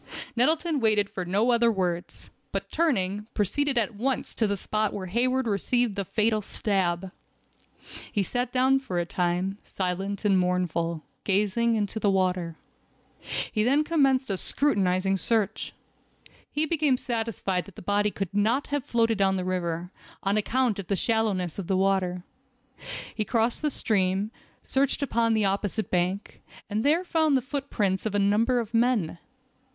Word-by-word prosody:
Nettleton 310 +5 +2
waited 210 -3 +2
for 185 - -4
no 205 +7 +2
other 235 -1 +4
words, 180 -4 -3 0.2
but - - -3
turning, 210 - 0
proceeded 270 +7 +1
at 230 0 +1
once 255 +5 -1
to 220 - +1
the 200 0 -1
spot 215 +2 -1
where 195 -2 -4
Hayward 250 +7 +1
received 225 +1 +1
the 200 - -1
fatal 215 +3 +1
stab. 190 -3 -1 1.0
He 205 - +1
sat 245 +4 -2
down 260 +1 +3
for 225 -10 -4
a 175 - +1
time, 180 +3 -1
silent 195 +3 -3
and 195 -2 +4
mournful, 170 -3 0 0.2
gazing 210 +4 +2
into 210 0 -1
the 205 - +2
water. 180 -3 0 1.0
He 215 - +1
then 275 +6 +3
commenced 270 -7 +2
a 195 - 0
scrutinizing 195 -7 +2
search. 215 +2 0 0.8
He 300 +2 +1
became 300 -5 +2
satisfied 225 -7 -2
that 200 - -14
the - - -10
body 205 +2 +2
could 195 -2 -4
not 220 +7 +2
have 290 -3 0
floated 230 -3 +1
down 190 -1 +3
the 185 -1 -2
river, 175 -1 -2 0.3
on 195 +1 +1
account 225 0 +1
of 190 - -6
the 200 - +1
shallowness 200 -5 0
of 185 - -5
the 190 - +1
water. 190 -2 +1 0.9
He 215 - -1
crossed 230 +2 0
the 305 - +1
stream, 200 -4 0 0.3
searched 275 +1 +1
upon 230 -4 +2
the 215 -2 +2
opposite 200 +2 -1
bank, 180 +3 -1 0.3
and 215 +2 0
there 315 +5 +3
found 315 -5 +2
the - - 0
footprints 235 -9 -1
of 205 - -3
a - - +3
number 215 +5 +3
of 230 -1 -5
men. 230 -8 +1
210 Hz, 160 wpm, -27 LUFS, 190-245 Hz, 1.0 s, other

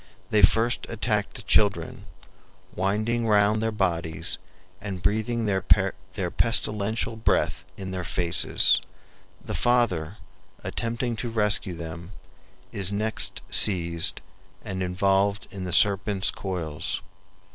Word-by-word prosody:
They 105 - +4
first 115 +4 +3
attacked 105 -2 -1
the - - -6
children, - - +1 0.7
winding 110 +5 0
round 105 0 +3
their 110 0 0
bodies 85 -6 -1 0.4
and 100 -3 -5
breathing 110 +4 0
their 95 -2 0 0.7
pestilential 110 -1 0
breath 110 - 0
in 95 -1 -6
their 90 -1 -4
faces. 85 -1 +2 0.6
The - - -4
father, 105 -8 +1 0.5
attempting 115 0 -2
to 120 - -3
rescue 105 -4 +2
them, 85 +3 -8 0.6
is 100 -1 +1
next 110 +2 -1
seized 85 -4 +2 0.4
and 95 0 -4
involved 95 +4 +1
in 95 -2 -6
the 90 - -4
serpents' 100 0 +3
coils. 85 -6 -3
100 Hz, 110 wpm, -25 LUFS, 90-110 Hz, 0.7 s, They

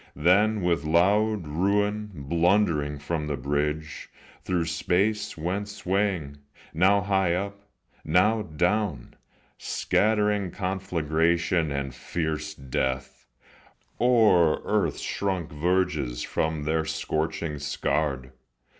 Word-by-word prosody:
Then 100 +7 +3
with 85 -4 +1
loud 100 +5 +2
ruin, 105 +6 0
blundering 80 0 +1
from 75 +2 -3
the 75 -2 -2
bridge, 75 +3 -2 0.3
Through 90 -3 0
space 95 +6 0
went 95 +6 -2
swaying, 95 -7 -1 0.4
now 95 +5 +4
high 95 -3 +1
up, 100 +2 -4 0.4
now 100 +8 +3
down, 90 - -1 0.5
Scattering 105 -2 +1
conflagration 85 -3 0
and 70 -2 -3
fierce 80 -3 -3
death 65 -1 -3 0.7
O'er 110 -10 +4
earth's - - 0
shrunk 95 -5 -2
verges 85 -6 0
where 80 -1 0
their 80 +1 0
scorchings 80 -1 -3
scarred. 70 -3 -1
85 Hz, 95 wpm, -26 LUFS, 75-100 Hz, 0.7 s, now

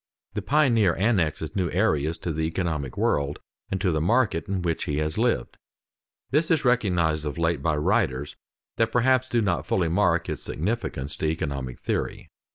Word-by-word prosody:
The 105 - -2
pioneer 115 - +3
annexes 95 -7 0
new 90 -4 0
areas 80 -5 +1
to 85 - -1
the 80 - -2
economic 80 -5 -2
world 70 0 +1 0.3
and 95 - -2
to 95 -3 +2
the 80 -1 0
market 105 -1 +2
in 95 -2 -2
which 85 -2 -1
he 75 - -2
has 75 0 -1
lived. 115 - 0 0.7
This 155 +4 +2
is 160 -5 +2
recognized 90 -11 +2
of 75 0 -4
late 85 -3 0
by 75 +1 +1
writers 70 -2 0 0.4
that 115 0 +2
perhaps 130 +2 +3
do 120 -2 +2
not 90 -4 -1
fully 85 -3 +1
mark 90 -1 +2
its - - -4
significance 80 - -3
to 80 - -1
economic 70 -5 -3
theory. - - -3
85 Hz, 170 wpm, -25 LUFS, 75-110 Hz, 0.7 s, pioneer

